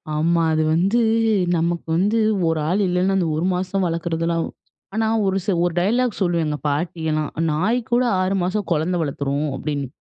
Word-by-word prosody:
ஆமா. 165 +2 +2
அது 155 - +2
வந்து 195 +8 +2 0.6
நமக்கு 170 0 -1
வந்து 205 +5 +2 0.3
ஒரு 160 -1 +1
ஆள் 200 +3 +1
இல்லன்னா, 180 +2 +1
அந்த 175 -3 +1
ஒரு 170 - 0
மாசம் 185 +1 -1
வளர்க்கிறதுலாம் 165 0 -1 0.5
ஆனா 220 0 +1 0.2
ஒரு 195 0 +1
ச - - -2 0.2
ஒரு 175 - -1
டயலாக் 235 +5 +1
சொல்லும் 175 -2 +1
எங்க 150 -1 -2
பாட்டி 160 +3 -2
எல்லாம். 155 -1 -1 0.2
"நாய் 195 +11 +1
கூட 245 +1 +3 0.2
6 185 +1 0
மாசம் 195 +3 -1
குழந்தை 170 +3 +1
வளர்த்துரும்" 140 0 -2
அப்பிடின்னு. 140 -1 -3
170 Hz, 170 wpm, -21 LUFS, 160-195 Hz, 0.6 s, கூட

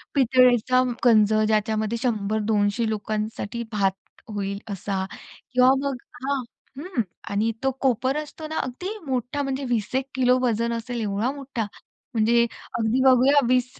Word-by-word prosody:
पितळेचा 255 -1 +4 0.2
गंज, 215 -2 +5
ज्याच्यामध्ये 215 +1 0
100-200 215 -1 0
लोकांसाठी 215 +1 -3
भात 195 -2 +2 0.4
होईल 200 -1 -3
असा. 195 0 -2 0.5
किंवा 255 +1 +6 0.2
मग 275 - -2 0.3
हां, 275 0 -1 0.4
हं. 330 -6 -2 0.3
आणि 215 +3 +1
तो 270 - +2
कोपर 260 +2 +1
असतो 305 +1 -6
ना, 315 - -4
अगदी 360 - -4
मोठा 260 +2 -1
म्हणजे 270 0 -2
20-1 245 +3 0
किलो 255 0 +4
वजन 235 -1 +1
असेल 235 0 -4
एवढा 210 +5 0
मोठा! 270 -6 -4 0.5
म्हणजे 235 +1 +4 0.4
अगदी 225 +3 +1
बघूया 265 +2 +6
20, 250 0 +3
235 Hz, 130 wpm, -24 LUFS, 215-260 Hz, 0.5 s, किंवा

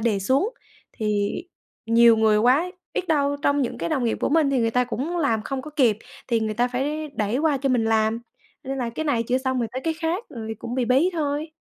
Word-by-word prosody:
đề 220 -3 +1
xuống. 265 - +1 0.4
Thì 210 -2 -1 0.5
nhiều 230 0 +6
người 220 -1 +4
quá 260 +11 +3 0.2
biết 365 - -2
đâu 285 -2 +2
trong 285 -1 +2
những 240 - -3
cái 170 - -2
đồng 250 +5 0
nghiệp 230 - 0
của - - +1
mình 300 -1 +3
thì 270 - +1
người 230 -1 +1
ta 250 +2 +2
cũng 275 +8 -3
làm 230 -10 +1
không 265 +1 -4
có 305 - -9
kịp 245 -8 +2 0.3
thì 230 -2 +2
người 220 -1 -2
ta 245 +2 +1
phải 295 +5 -2
đẩy 215 +2 -1
qua 300 -1 +2
cho 270 +1 -1
mình 245 -3 +2
làm, 220 0 +2 0.5
nên 270 0 -4
là 240 -2 -2
cái 315 +7 -4
này 240 -6 +1
chưa 250 +3 0
xong 260 -1 -1
rồi 235 -2 -1
tới 260 - -3
cái 325 - 0
khác 330 +7 -2
rồi 220 -2 -6
cũng 235 +1 -5
bị 255 -2 +1
bí 270 +10 +3
thôi. 300 -1 -2
255 Hz, 240 wpm, -24 LUFS, 225-290 Hz, 0.5 s, nhiều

